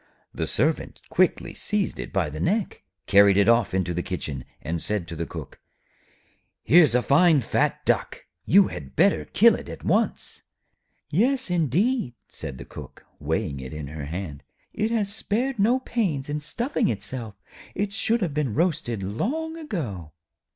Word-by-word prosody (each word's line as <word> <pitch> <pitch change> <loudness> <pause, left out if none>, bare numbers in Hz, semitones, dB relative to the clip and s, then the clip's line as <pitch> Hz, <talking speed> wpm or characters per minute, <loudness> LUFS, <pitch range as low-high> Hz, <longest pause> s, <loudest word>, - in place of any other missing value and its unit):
The - - -2
Servant - - 0
quickly - - +1
seized 210 -2 -1
it - - -6
by 90 -7 0
the 75 - -6
neck, 200 - -1 0.2
carried 100 -1 +6
it 100 0 +4
off 115 -2 +4
into 90 -2 0
the 90 - -1
kitchen, 75 -8 -5
and 80 +3 -4
said 105 -5 -2
to 85 - -6
the 85 +1 -4
Cook: - - -9 1.0
'Here's 150 -3 +6
a 125 - +3
fine 160 +2 +5
fat - - 0
Duck. - - 0 0.2
You 195 +1 +5
had 70 -2 -8
better - - +3
kill - - +5
it - - -6
at - - -9
once.' - - 0 0.7
'Yes, 250 - +2
indeed,' 175 - +1
said 65 -2 -7
the - - -9
Cook, - - -11
weighing 70 - -2
it 65 +1 -7
in 75 -2 -6
her 75 -1 -6
hand. 80 -2 -6 0.3
'It 215 +1 0
has 210 -3 0
spared 235 +4 -1
no 235 +6 +3
pains 175 - -1
in 150 +1 -1
stuffing 235 - -1
itself; 110 0 -5 0.4
it 200 +1 -2
should 225 +1 +1
have 165 -5 -2
been 140 -7 -1
roasted 150 - 0
long 280 - -2
ago.' 130 - -5
140 Hz, 165 wpm, -25 LUFS, -, 1.0 s, carried